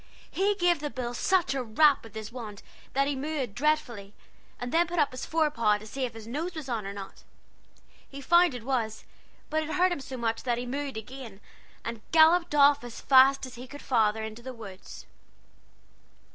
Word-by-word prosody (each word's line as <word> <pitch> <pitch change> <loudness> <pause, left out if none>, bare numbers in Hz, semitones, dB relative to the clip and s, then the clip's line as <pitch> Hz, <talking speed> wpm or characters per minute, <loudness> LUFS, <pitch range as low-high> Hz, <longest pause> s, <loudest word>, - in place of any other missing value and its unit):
He 400 +2 +1
gave 350 -4 +2
the 295 0 -3
bull 245 -3 -4
such 350 +2 +1
a 270 - -1
rap 275 +6 +4
with 225 -1 -13
his 220 0 -6
wand 220 -5 -8 0.3
that 275 +1 +2
he 285 - -1
moo 305 +4 -3
ed 240 -6 -4
dreadfully, 245 -7 -1 0.4
and 245 0 -4
then 340 +1 +3
put 350 +1 -5
up 295 -3 +3
his 255 - -6
fore 315 -2 +1
paw, 215 -6 +2
to 210 - -12
see 260 +4 -3
if 240 -2 -7
his 225 -1 -9
nose 305 +10 -4
was 310 -4 -6
on 225 -5 -3
or - - -4
not. 195 -1 -9 0.9
He 280 - -9
found 345 +1 +4
it 240 - -7
was, 230 -4 -2 0.5
but 315 0 +1
it 310 - -5
hurt 365 +2 +2
him 350 - -2
so 265 -1 -7
that 235 +1 -1
he 245 - -4
'moo 280 +4 -3
ed' 265 - -7
again, 225 -2 -9 0.5
and 230 -1 -5
galloped 330 0 +5
off 285 -1 +5
as 240 -1 -8
fast 270 0 +5
as 255 - -10
he 250 +1 -9
could 285 +3 -11
into 220 -1 +1
the 260 +1 -7
woods. 195 -4 -11
260 Hz, 205 wpm, -28 LUFS, 225-300 Hz, 0.9 s, galloped